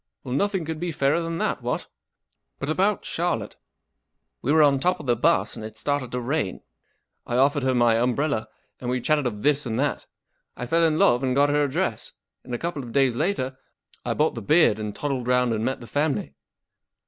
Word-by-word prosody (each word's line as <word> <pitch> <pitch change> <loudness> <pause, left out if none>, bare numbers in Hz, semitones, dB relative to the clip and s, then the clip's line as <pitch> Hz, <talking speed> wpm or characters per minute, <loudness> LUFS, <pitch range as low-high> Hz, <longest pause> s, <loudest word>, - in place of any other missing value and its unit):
Well, 125 - -5
nothing 190 +3 0
could 160 0 -4
be 175 0 -2
fairer 150 +2 +1
than 165 0 -3
that, - - -1
what? - - -2 0.7
But 140 - -4
about 195 +5 +1
Charlotte. 140 -12 -2 0.8
We 125 - -3
w 155 - +4
ere 155 - +7
on 140 -2 +4
top 180 +6 +1
of 150 - -9
the 120 -2 +2
bus, 165 +9 +2
and - - -8
it 110 0 -8
started 145 0 -2
to 125 - -1
rain. 125 -5 -2 0.7
I 120 - -2
offered 140 +2 +3
her 130 -1 +1
my 120 -2 +4
umbrella, 125 0 0 0.3
and 125 - -4
we 125 0 0
chatted 150 +1 +1
of 105 -3 -5
this 145 -2 +2
and 115 -1 -2
that. 140 +2 -1 0.5
I 125 - -4
fell 165 +6 +2
in 155 -1 +3
love 120 -4 +4
and 130 -1 0
got 145 +1 +4
her 145 0 +2
address, 140 -2 -2 0.3
and 125 - -5
a - - -2
couple 170 -1 -3
of 120 -3 -9
days 135 -4 +3
later 135 -4 -1 0.4
I - - -2
bought 155 +1 +2
the 115 - -6
beard 150 - +4
and 105 -1 -4
toddled 135 -4 -3
round 125 -1 +2
and 110 0 -2
met 130 +2 -2
the - - -8
family." 145 - -1
135 Hz, 215 wpm, -24 LUFS, 120-155 Hz, 0.8 s, ere